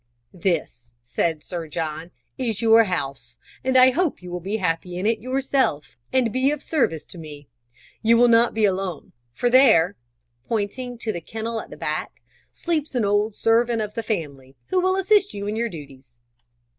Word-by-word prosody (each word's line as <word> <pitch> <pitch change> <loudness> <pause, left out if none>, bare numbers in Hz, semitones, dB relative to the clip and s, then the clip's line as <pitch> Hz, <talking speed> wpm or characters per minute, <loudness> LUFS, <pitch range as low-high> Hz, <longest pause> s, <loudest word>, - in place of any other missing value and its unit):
"This," 160 -10 -2
said 155 +6 -1
Sir 170 -3 -6
John, 160 +1 -4 0.3
"is 230 -6 -2
your 225 0 +6
house, 135 - -4 0.3
and 260 0 +2
I 255 0 +7
hope 325 - -1
you 180 - -8
will 180 - -3
be 195 +5 -3
happy 175 -1 -2
in 185 - -3
it 225 0 +2
yourself, 255 - -1 0.2
and 245 -4 +1
be 260 +2 +2
of 295 0 -3
service 165 - 0
to 175 - -12
me. 145 -3 -10 0.5
You 230 +1 +4
will 245 +1 +6
not 230 0 +4
be 220 -1 +3
alone, 190 -4 -2 0.2
for 245 - -1
there" 240 -8 +5 0.5
pointing 235 +3 -3
to 225 -1 -3
the 175 - -5
kennel 225 +2 -4
at - - -13
the - - -10
back - - -4 0.3
"sleeps 310 -5 -3
an 235 -4 +1
old 205 +1 +1
servant 230 +1 +2
of 210 -1 -3
the 230 - -3
family, 145 - -4
who 370 -1 +2
will 375 +1 +2
assist 390 +1 +2
you 200 0 -4
in 210 +1 -2
your 235 +1 -1
duties." 135 - -12
210 Hz, 180 wpm, -23 LUFS, 165-245 Hz, 0.5 s, I